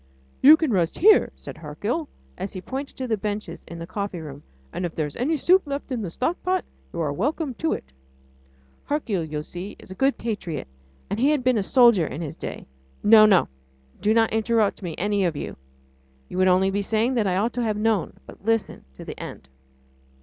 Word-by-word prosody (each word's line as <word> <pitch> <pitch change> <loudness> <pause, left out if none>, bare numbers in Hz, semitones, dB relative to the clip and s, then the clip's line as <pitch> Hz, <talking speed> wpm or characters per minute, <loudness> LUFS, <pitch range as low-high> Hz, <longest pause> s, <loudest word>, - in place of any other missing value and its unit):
"You 300 +4 +9
can 315 -6 0
rest 175 -3 +1
here," 425 +4 +6
said - - -9
Hercule, 205 - -3 0.3
and 190 +2 -4
he 185 - -7
pointed 265 +8 -6
to 260 - -3
the 220 -2 0
benches 205 -4 -4
in 170 - -9
the 165 - -6
coffee 195 0 -4
room, 145 -3 -9 0.3
"and - - -3
if 175 -2 -3
there 155 - 0
is 145 - -7
any 300 +6 0
soup 365 +7 +4
left 280 -1 -4
in 245 -3 -1
the 190 - -3
stockpot, 350 - -1 0.3
you 170 - -6
are 150 -3 0
welcome 280 - -1
to 320 - +1
it." - - -4 1.0
Hercule, 225 - -1
you 150 -1 -4
see, 180 +5 -7
is - - -13
a - - -4
good 270 +8 +1
patriot, 190 - -4 0.4
and 205 - -3
he 270 +4 +4
had 300 -4 +1
been 250 -3 +3
a - - +1
soldier 230 - +5
in - - -6
his 160 -4 -5
day.... - - -7 0.4
No! 215 0 +8
no... 190 -4 +4 0.5
do 210 - +2
not 225 0 +3
interrupt 220 -2 +1
me, 175 -4 -5
any 205 +1 +1
of 170 -4 0
you... - - -5 0.7
you 180 - -4
would 185 - +4
only 185 +1 +4
be 200 +1 0
saying 220 +5 +1
that 225 -5 +1
I 185 -1 +1
ought 225 +4 0
to 245 - -2
have 215 -2 0
known... 215 -3 +1
but - - -14
listen 225 0 -1
to - - -10
the - - -8
end. 65 - -9
210 Hz, 215 wpm, -24 LUFS, 180-255 Hz, 1.0 s, You